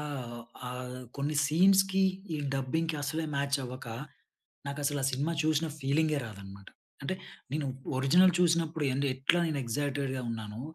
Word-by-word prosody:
ఆహ్, 130 -5 -5 0.3
ఆహ్, 125 0 -5 0.2
కొన్ని 145 +2 -1
సీన్స్‌కి, 190 +5 +5 0.3
ఈ - - 0 0.2
డబ్బింగ్‌కి 155 +5 0
అసలే 155 +3 -1
మ్యాచ్ 140 0 +1
అవ్వక, 125 0 -7 0.8
నాకసలా 145 0 -1
సినిమా 140 +5 0
చూసిన 155 +1 +2
ఫీలింగే 150 +2 +2
రాదన్నమాట. 100 -2 -10 0.3
అంటే 140 +7 -1 0.4
నేను 150 -1 -1 0.3
ఒరిజినల్ 175 +8 +6
చూసినప్పుడు 165 -3 +2
ఏం 130 - -1 0.2
ఎట్లా 135 +6 +2
నేను 155 -3 -1
ఎక్సైటెడ్‌గా 135 +2 -1
ఉన్నాను. 110 -1 -5
140 Hz, 130 wpm, -31 LUFS, 130-160 Hz, 0.8 s, ఒరిజినల్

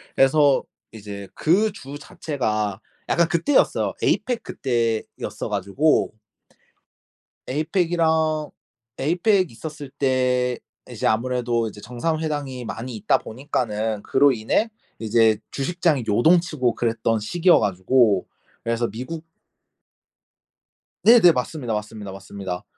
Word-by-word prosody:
그래서 140 0 +4 0.3
이제 100 -2 -8
그 200 +7 +2
주 140 -2 -9
자체가 110 -10 -3 0.3
약간 170 -1 +3
그때였어요. 175 - +2
에이팩 245 -2 0
그때였어 115 -4 -2
가지고 135 - +1 1.3
에이팩이랑 160 0 +1 0.5
에이팩 180 - +2
있었을 150 +3 -8
때 125 -2 +1 0.3
이제 - - -2
아무래도 120 0 0
이제 105 -1 -10
정상회담이 145 -1 -3
많이 115 +3 -6
있다 105 0 +2
보니까는 110 -4 -3
그로 140 +1 +4
인해 125 - 0 0.3
이제 110 -1 +3
주식장이 155 -1 0
요동치고 155 - +3
그랬던 115 -1 0
시기여 175 - +3
가지고 100 +2 +2 0.4
그래서 115 0 0
미국 155 +8 -6 1.8
네네. 220 -7 +8
맞습니다, 125 -3 -3
맞습니다, 105 -1 -5
맞습니다. 95 -2 -6
130 Hz, 270 characters per minute, -23 LUFS, 110-155 Hz, 1.8 s, 네네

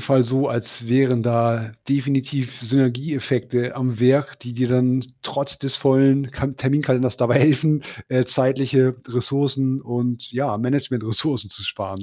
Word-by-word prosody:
Fall 130 -3 +3
so, 135 +4 0
als 115 0 -5
wären 125 -2 +3
da 115 -1 +1 0.2
definitiv 135 -2 -1
Synergieeffekte 125 -1 0
am 125 -3 -2
Werk, 135 +3 +3
die 120 0 -9
dir 125 +1 -1
dann 125 +1 +2 0.2
trotz 140 0 -4
des 135 -1 -3
vollen 135 -1 +3
Ka 135 -1 -2
Terminkalenders 130 -1 0
dabei 120 -1 +3
helfen, 150 0 +3 0.2
äh, 125 -1 +2
zeitliche 130 0 +2
Ressourcen 135 +2 -1
und 120 +1 -4
ja, 130 -4 -1
Management 125 -1 -1
Ressourcen 115 - -2
zu 100 - -9
sparen, 95 0 -5
130 Hz, 140 wpm, -21 LUFS, 120-135 Hz, 0.2 s, Fall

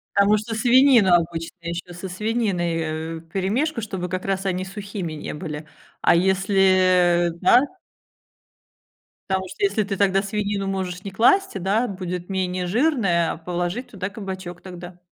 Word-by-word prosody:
Потому 200 +1 +5
что 220 +2 -4
свинина 240 -5 +5
обычно 165 -1 -4
ещё 170 +1 -5
со 180 +2 -7
свининой, 175 -6 -2
э, - - -8
вперемешку, 210 - -1
чтобы 185 -4 -4
как 185 +1 -4
раз 195 0 -1
они 185 0 -1
сухими 195 -4 -6
не 150 - -6
были. 150 -1 -6 0.4
А - - +5
если, 185 -2 +3
да 215 +7 +6 1.7
Потому 190 0 0
что 405 - -7
если 245 - +2
ты 195 0 -3
тогда 195 0 +2
свинину 200 -1 -2
можешь 190 -1 -3
не 200 - -6
класть, 380 - +3
э, 195 - -2
да, 210 +7 +1
будет 180 -2 -5
менее 185 -1 -1
жирная, 200 - +1
а - - -8
положить 175 +8 -3
туда 195 -1 -4
кабачок 190 -4 -7
тогда. 180 -1 -10
190 Hz, 150 wpm, -23 LUFS, 175-205 Hz, 1.7 s, да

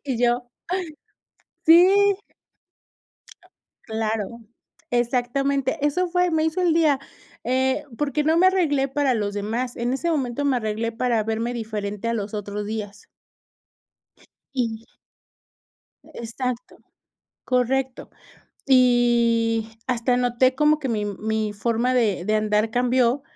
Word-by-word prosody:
y 260 -5 -2
yo, 245 0 +1 1.2
sí. 335 +3 +8 2.0
Claro, 220 0 -3 0.5
exactamente, 255 +4 0
eso 360 +4 0
fue, 360 0 +2
me 315 -1 +1
hizo 320 +3 -1
el 350 -3 +3
día, 305 -5 +3 0.5
eh, 260 +3 +1
porque 295 0 -1
no 320 +1 +3
me 370 - +6
arreglé 295 -8 +1
para 275 -1 +1
los 205 -3 -2
demás, 230 +5 -3
en 240 +2 -1
ese 335 +5 -1
momento 275 -2 -1
me 270 -3 +2
arreglé 220 0 -2
para 230 -1 0
verme 225 +2 -2
diferente 215 -1 -4
a - - 0
los 210 -2 -4
otros 205 0 -4
días. 210 -1 -6 1.5
Y 230 -3 -3 1.3
Exacto, 245 +3 -5 0.7
correcto. 255 +1 -1 0.6
Y 235 -3 +3 0.2
hasta 245 0 +1
noté 250 +1 +2
como 300 +2 +3
que 275 -3 -4
mi 215 -3 -1
mi 215 +1 -2
forma 235 +4 0
de 210 -8 +1
de 215 +1 0
andar 215 +1 +1
cambió. 250 +2 +2
245 Hz, 120 wpm, -23 LUFS, 220-270 Hz, 2.0 s, sí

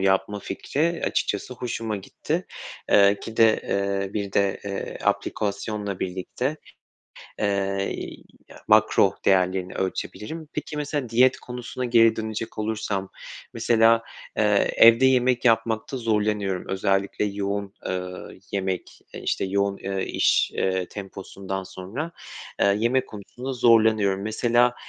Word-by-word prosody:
yapma 95 +1 +1
fikri 155 +12 -2
açıkçası 105 +5 -1
hoşuma 115 -3 -3
gitti. 95 - -4 0.4
Eee, 100 0 +5
ki 115 - -8
de, 115 -1 +5
eee, 100 0 -1
bir 100 -2 -3
de, 100 0 +1
eee, 100 -1 -5
aplikasyonla 100 -1 -2
birlikte, 95 +10 -3 0.8
eee, 100 -1 0 0.5
ya - - -15
makro - - +4
değerlerini 95 -1 +2
ölçebilirim. 105 - -4
Peki, 150 0 -5
mesela 145 -3 -2
diyet 125 +3 +4
konusuna 125 +1 -5
geri 115 -2 +5
dönecek 110 0 -5
olursam 105 -3 -2 0.4
mesela, 115 0 +4 0.3
eee, 105 -2 +3
evde 115 +3 +7
yemek 125 -1 +3
yapmakta 115 +1 +1
zorlanıyorum, 105 -4 0
özellikle 95 +1 0
yoğun, 100 0 -3
eee, 90 0 -3 0.4
yemek, 95 -2 -3
eee, - - -6
işte, - - 0
yoğun, 100 +1 0
eee, 95 -1 -3
iş, - - +2
eee, 95 -1 0
temposundan 95 -1 -6
sonra, 105 - -6 0.5
eee, 100 0 +4
yemek 125 +3 +1
konusunda 120 +5 -7
zorlanıyorum. 110 -4 +4
Mesela, 120 +3 +2
105 Hz, 120 wpm, -24 LUFS, 95-115 Hz, 0.8 s, evde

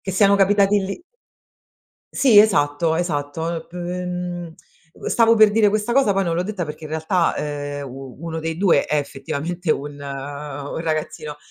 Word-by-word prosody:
che 190 - -4
siano 200 +1 +4
capitati 200 +1 +4
lì 200 - -6 1.1
Sì 245 -7 +5
esatto, 160 -6 +3
esatto 160 -1 -2
l 165 - -6
p 170 - -20
mhmm, 180 -1 -4 0.4
uhm, - - -10
stavo 230 -1 +4
per 215 -1 +6
dire 210 0 +4
questa 215 +3 -1
cosa 255 -7 +3
poi 195 0 +1
non 165 -1 -1
l'ho 175 - 0
detta, 195 -3 -3
perché 155 +1 -8
in 150 - -8
realtà, 160 +2 0
ehm, 145 -1 -4
u 130 0 -9
uno 165 -1 -4
dei 160 0 -3
2 190 -1 +3
è 150 - 0
effettivamente 150 +5 -3
un 145 0 -1
un 140 +1 -6
ragazzino, 155 -2 -3
165 Hz, 170 wpm, -21 LUFS, 145-195 Hz, 1.1 s, per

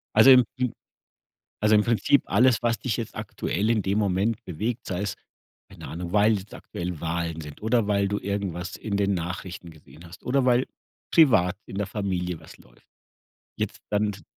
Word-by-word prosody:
Also 110 +5 +8
im 125 -2 +8
im 125 -2 -1 0.9
also, 105 0 +5
im 105 - +5
Prinzip 115 +4 +3
alles, 120 +3 +3
was 115 -1 +1
dich 125 -5 -1
jetzt 115 - -5
aktuell 105 +5 -2
in 115 -2 +2
dem 100 +1 0
Moment 100 +2 0
bewegt, 110 +8 -3
sei 90 +1 -2
es, 105 - -2 0.5
keine - - -10
Ahnung, 85 +2 -6
weil 105 +1 +4
jetzt 95 +2 -13
aktuell 85 -2 -6
Wahlen 85 -1 -2
sind 75 -1 -10
oder 115 +1 +2
weil 100 -1 +1
du 100 +1 -1
irgendwas 95 -4 -3
in 105 -2 -3
den 100 0 +2
Nachrichten 90 0 -5
gesehen 80 +1 -15
hast 85 +3 -13
oder 130 +1 +1
weil 125 +1 +3 0.4
privat 100 - +5
in 95 - -8
der 105 - 0
Familie 90 -5 -2
was - - -14
läuft. - - -22 0.7
Jetzt - - -3
dann 105 0 +1
t 95 - -12
100 Hz, 185 wpm, -25 LUFS, 90-110 Hz, 0.9 s, Also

